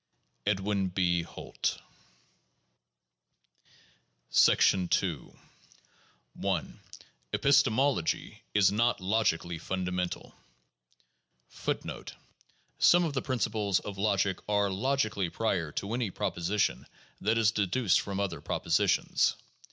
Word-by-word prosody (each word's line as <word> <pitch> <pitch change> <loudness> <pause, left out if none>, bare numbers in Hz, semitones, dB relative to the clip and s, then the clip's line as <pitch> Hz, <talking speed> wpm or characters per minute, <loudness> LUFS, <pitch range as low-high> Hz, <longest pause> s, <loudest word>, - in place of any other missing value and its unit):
Edwin 100 -1 0
B. 90 -1 +1
Holt. 85 - -4 2.6
II 90 -3 +3 1.1
1. 95 -8 -3 0.5
Epistemology 135 - +2
is 100 -2 +5
not 115 +3 +1
logically 95 -4 0
fundamental. 90 0 -3 1.3
1 - - +1
1 - - -7 0.7
Some 175 0 +6
of 160 -4 -1
the 135 - -1
principles 110 -6 0
of 100 -1 -7
logic 100 -2 +1
are 100 -1 +2
logically 110 -3 0
prior 90 -7 -1
to 100 +3 -3
any 120 -3 -1
proposition 90 +3 -1 0.3
that 110 +3 +1
is 110 -2 +4
deduced 105 -1 +2
from 100 -1 -4
other 100 -1 -2
propositions. - - +1
100 Hz, 90 wpm, -29 LUFS, 90-110 Hz, 2.6 s, Some